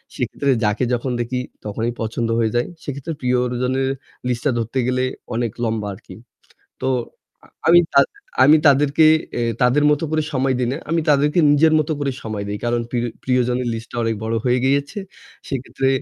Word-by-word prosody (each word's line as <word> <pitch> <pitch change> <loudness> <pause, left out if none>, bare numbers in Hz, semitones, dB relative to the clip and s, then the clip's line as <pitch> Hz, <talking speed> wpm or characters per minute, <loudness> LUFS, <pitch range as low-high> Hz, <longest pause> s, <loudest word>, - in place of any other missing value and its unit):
সেক্ষেত্রে 140 -1 -1
যাকে 105 +4 +1
যখন 125 +2 -1
দেখি 125 +2 -2 0.3
তখনই 110 +3 -2
পছন্দ 115 +1 -2
হয়ে 110 -2 +1
যায়। 120 - +1 0.2
সেক্ষেত্রে 140 +3 -5
প্রিয়জনের 125 +1 0 0.4
লিস্টটা 125 +3 0
ধরতে 115 +3 -2
গেলে 130 0 +1 0.3
অনেক 120 -2 -1
লম্বা 110 -2 -1
আরকি। - - -13 0.7
তো 130 - +1 0.8
আমি 175 +1 +8
তা 140 - +7 0.4
আমি 150 +3 +7
তাদেরকে 145 +2 +5 0.6
তাদের 125 +4 +4
মত 150 - +2
করে 155 -1 +1
সময় 130 -1 +1
দিই 125 -1 0
না। - - -2
আমি 165 0 +2
তাদেরকে 150 +4 +3
নিজের 155 +2 +4
মত 155 +1 -1
করে 140 -1 0
সময় 105 -2 -4
দেই। 105 0 -3
কারণ 120 0 +1
প্রি 120 - -1 0.3
প্রিয়জনের 125 -1 +1
লিস্টটা 115 +1 -7
অনেক 115 0 0
বড় 115 +1 -1
হয়ে 125 0 +2
গিয়েছে। 140 +9 0 0.5
সেক্ষেত্রে 135 0 -2
125 Hz, 160 wpm, -20 LUFS, 120-140 Hz, 0.8 s, আমি